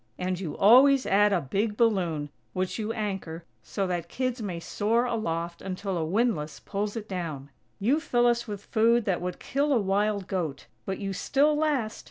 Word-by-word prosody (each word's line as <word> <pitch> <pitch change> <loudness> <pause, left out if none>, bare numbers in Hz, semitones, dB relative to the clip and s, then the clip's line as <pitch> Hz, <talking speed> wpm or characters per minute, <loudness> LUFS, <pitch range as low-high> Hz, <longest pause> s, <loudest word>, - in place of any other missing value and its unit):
And 180 0 -2
you 170 -6 -5
always 265 +6 +6
add 205 +1 +4
a 190 - +3
big 200 +9 -2
balloon, 175 -10 +1 0.2
which 185 +4 -2
you 215 0 -2
anchor, 195 -7 -4 0.2
so 195 - -3
that 175 -2 -3
kids 255 +1 -2
may 185 -5 -4
soar 225 +7 0
aloft 170 -8 -3
until 190 0 -4
a 165 - -1
windlass 170 -4 0
pulls 205 +1 -3
it 220 -2 -5
down. 155 -7 -5 0.3
You 250 +10 +2
fill 245 -6 +1
us 235 0 +2
with 205 -2 -6
food 230 0 +3
that 185 -4 0
would 180 0 -3
kill 285 +2 -1
a 255 - +4
wild 200 0 0
goat, 165 -7 -3 0.2
but 190 -1 -2
you 195 -2 -4
still 285 +9 +2
last! 290 -8 0
200 Hz, 185 wpm, -27 LUFS, 180-235 Hz, 0.3 s, always